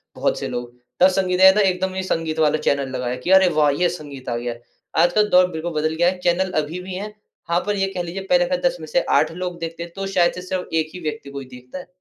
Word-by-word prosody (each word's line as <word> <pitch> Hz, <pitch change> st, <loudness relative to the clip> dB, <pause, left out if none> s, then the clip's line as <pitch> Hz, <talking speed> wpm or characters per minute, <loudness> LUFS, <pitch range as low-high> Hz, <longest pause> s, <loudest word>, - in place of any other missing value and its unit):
बहुत -, -, 0 dB
से -, -, -3 dB
लोग। 120 Hz, 0 st, -5 dB, 0.3 s
तब 185 Hz, -, +8 dB
संगीत 185 Hz, -1 st, 0 dB
आया 190 Hz, 0 st, +10 dB
था 210 Hz, -, +4 dB
एकदम 190 Hz, 0 st, 0 dB
संगीत 165 Hz, -3 st, -2 dB
वाला 155 Hz, -1 st, +3 dB
चैनल 140 Hz, -1 st, +1 dB
लगाया 125 Hz, -1 st, -2 dB
कि 180 Hz, -, +1 dB
अरे, 190 Hz, -1 st, +7 dB
वाह! 150 Hz, -2 st, +3 dB
ये 175 Hz, +5 st, +1 dB
संगीत 145 Hz, -6 st, -8 dB
आ 120 Hz, -, -1 dB
गया, 120 Hz, 0 st, -3 dB, 0.5 s
आज 175 Hz, 0 st, +2 dB
का 210 Hz, -, +4 dB
दौर 185 Hz, -3 st, +4 dB
बिल्कुल 160 Hz, +1 st, -4 dB
बदल 155 Hz, +1 st, 0 dB
गया 175 Hz, +2 st, +3 dB
है, 185 Hz, -, -4 dB
चैनल 180 Hz, +1 st, +1 dB
अभी 160 Hz, +5 st, -6 dB
भी 185 Hz, +1 st, -7 dB
है। 210 Hz, +3 st, -6 dB, 0.4 s
हाँ, 170 Hz, -, +3 dB
पर 205 Hz, -, +1 dB
ये 195 Hz, -1 st, 0 dB
कह 180 Hz, -, -1 dB
लीजिए 175 Hz, +3 st, -5 dB
पहले 265 Hz, 0 st, +4 dB
का 275 Hz, -, +2 dB
10 -, -, -2 dB
में -, -, -8 dB
से -, -, +2 dB, 0.2 s
8 -, -, 0 dB
लोग 180 Hz, 0 st, -5 dB
देखते 165 Hz, 0 st, -5 dB
हैं 170 Hz, -, -10 dB
तो 195 Hz, 0 st, -4 dB
शायद 175 Hz, -3 st, +2 dB
से 180 Hz, -, -7 dB
सिर्फ़ 185 Hz, 0 st, -4 dB
एक 160 Hz, -1 st, +1 dB
ही 180 Hz, -, -7 dB
व्यक्ति 150 Hz, -3 st, -5 dB
कोई 140 Hz, -1 st, -7 dB
देखता 125 Hz, +6 st, -10 dB
है। 180 Hz, -, -11 dB
175 Hz, 270 wpm, -21 LUFS, 155-190 Hz, 0.5 s, आया